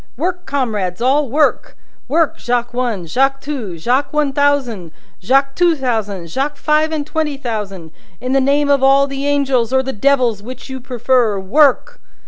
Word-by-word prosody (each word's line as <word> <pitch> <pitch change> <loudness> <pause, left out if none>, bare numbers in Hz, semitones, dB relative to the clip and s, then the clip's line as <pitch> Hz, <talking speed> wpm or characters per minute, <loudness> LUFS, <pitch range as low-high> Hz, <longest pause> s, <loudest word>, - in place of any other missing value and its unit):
"Work, 360 +4 -3
comrades 215 -10 -2
all, 270 +3 +2
work! 300 +4 0 0.3
Work, 325 +1 +1
Jacques 240 -1 -1
One, 240 -7 -2
Jacques 270 +10 +1
Two, 255 - -5
Jacques 250 - 0
One 300 -2 0
Thousand, 265 - 0 0.3
Jacques 270 +7 +2
Two 350 -2 +3
Thousand, 220 - -2
Jacques 280 - -3
Five 305 +2 +1
and 305 -2 -2
Twenty 305 -2 -2
Thousand; 205 - -5 0.3
in 255 +1 -4
the 270 - +3
name 285 +2 +2
of 280 -2 +3
all 275 +1 +5
the 275 0 -4
Angels 270 -5 +1
or 265 0 +2
the 265 0 -4
Devils 245 -3 +1
which 255 +4 -9
you 265 - -5
prefer 245 -3 0
work!" 290 - +2
265 Hz, 165 wpm, -17 LUFS, 235-285 Hz, 0.3 s, all